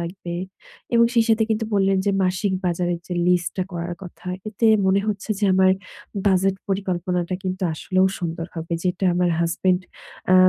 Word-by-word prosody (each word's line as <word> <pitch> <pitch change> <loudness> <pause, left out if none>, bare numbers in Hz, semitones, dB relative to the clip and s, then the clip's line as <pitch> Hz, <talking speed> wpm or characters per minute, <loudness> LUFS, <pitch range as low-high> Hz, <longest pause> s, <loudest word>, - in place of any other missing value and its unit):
লাগবে। 170 0 -5 0.6
এবং 235 0 +6
সেই 230 -1 +5
সাথে 220 0 +4
কিন্তু 220 +1 +1
বললেন 195 -1 +3
যে - - +4
মাসিক 185 +2 0
বাজারের 175 0 0
যে 180 - -4
লিস্টটা 180 +1 +1
করার 175 0 -4
কথা। 180 0 -11 0.2
এতে 215 +2 0 0.2
মনে 190 +1 +4
হচ্ছে 210 0 -3
যে 210 - 0
আমার 190 0 +5 0.5
বাজেট 190 0 +3
পরিকল্পনাটা 180 -2 -1
কিন্তু 185 +1 -3
আসলেও 185 +4 +2
সুন্দর 165 -1 -3
হবে। 165 0 -5
যেটা 180 +1 0
আমার 175 0 +2
হাসব্যান্ড 180 +2 +1 0.5
আ - - +7
185 Hz, 160 wpm, -23 LUFS, 175-195 Hz, 0.6 s, আ